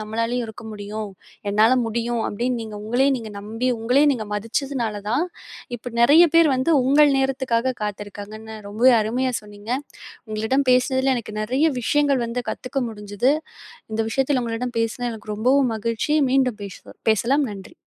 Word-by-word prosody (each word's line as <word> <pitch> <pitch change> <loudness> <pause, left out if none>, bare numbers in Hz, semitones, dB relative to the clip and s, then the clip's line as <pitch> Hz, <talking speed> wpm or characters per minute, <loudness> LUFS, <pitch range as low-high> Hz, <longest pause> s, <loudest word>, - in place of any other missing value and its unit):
நம்மளாலயும் 230 +3 -2
இருக்க 220 0 -10
முடியும். 210 0 -6 0.4
என்னால 215 +4 +4
முடியும் 235 +1 -1
அப்படின்னு 245 +4 -1
நீங்க 215 -1 -7
உங்களையே 250 +5 +2
நீங்க 225 -3 -7
நம்பி 225 +5 -3
உங்களையே 250 +6 +3
நீங்க 225 -4 -3
மதிச்சதுனாலதான் 230 - -1 0.5
இப்ப 245 +1 -8
நிறைய 290 +8 +7
பேர் 330 -1 +6
வந்து 260 +5 0
உங்கள் 290 +3 +5
நேரத்துக்காகக் 260 -2 0
காத்திருக்காங்கன்னு 210 +1 -6
ரொம்ப 215 +4 -3 0.2
அருமையா 250 +4 0
சொன்னீங்க. 205 +1 -11 0.6
உங்களிடம் 220 +6 0
பேசினதுல 260 +1 +3
எனக்கு 215 -3 -6
நிறைய 255 +7 -1 0.2
விஷயங்கள் 280 +1 +2
வந்து 240 +2 -3
கத்துக்க 255 +2 -4
முடிஞ்சுது. 210 +4 0 0.6
இந்த 220 - +1
விஷயத்துல 265 +1 +1
உங்களிடம் 235 +1 -3
பேசினது 235 +2 -1
எனக்கு 215 -1 -7
ரொம்பவும் 255 +3 +3
மகிழ்ச்சி. 230 +6 -1 0.2
மீண்டும் 255 -4 +2
பேசுவ 200 -2 -10
பேசலாம், 250 +7 +2
நன்றி. 195 -2 -10
235 Hz, 140 wpm, -22 LUFS, 215-260 Hz, 0.6 s, நிறைய